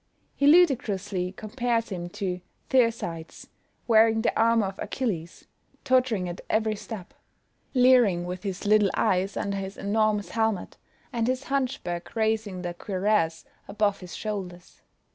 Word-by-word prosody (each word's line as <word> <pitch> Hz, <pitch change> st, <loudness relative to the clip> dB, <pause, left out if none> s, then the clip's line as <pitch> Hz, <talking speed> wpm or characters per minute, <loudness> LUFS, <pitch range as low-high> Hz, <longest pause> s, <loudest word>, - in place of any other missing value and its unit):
He 280 Hz, -, +2 dB
ludicrously 215 Hz, -, +3 dB
compares 230 Hz, +3 st, -2 dB
him 175 Hz, -3 st, -5 dB
to 180 Hz, 0 st, -4 dB, 0.3 s
Thersites 230 Hz, -10 st, 0 dB, 0.4 s
wearing 225 Hz, -1 st, +5 dB
the -, -, +1 dB
armour 230 Hz, -1 st, +3 dB
of 195 Hz, 0 st, -6 dB
Achilles, 185 Hz, -10 st, -4 dB, 0.4 s
tottering 255 Hz, -8 st, +2 dB
at 175 Hz, 0 st, -6 dB
every 220 Hz, 0 st, +1 dB
step; 205 Hz, -3 st, -8 dB, 0.6 s
leering 245 Hz, -9 st, +5 dB
with 180 Hz, 0 st, -5 dB
his 195 Hz, -1 st, -5 dB
little 210 Hz, -1 st, +4 dB
eyes 190 Hz, +2 st, +1 dB
under 200 Hz, 0 st, -2 dB
his 195 Hz, 0 st, -5 dB
enormous 210 Hz, 0 st, +1 dB
helmet, 220 Hz, -4 st, -1 dB, 0.4 s
and 230 Hz, -1 st, 0 dB
his 255 Hz, +1 st, -1 dB
hunchback 255 Hz, -12 st, -3 dB
raising 220 Hz, -4 st, -1 dB
the 175 Hz, -1 st, -3 dB
cuirass 185 Hz, -3 st, 0 dB, 0.2 s
above 205 Hz, 0 st, 0 dB
his 180 Hz, -2 st, -9 dB
shoulders. 185 Hz, -5 st, -6 dB
210 Hz, 130 wpm, -26 LUFS, 185-230 Hz, 0.6 s, wearing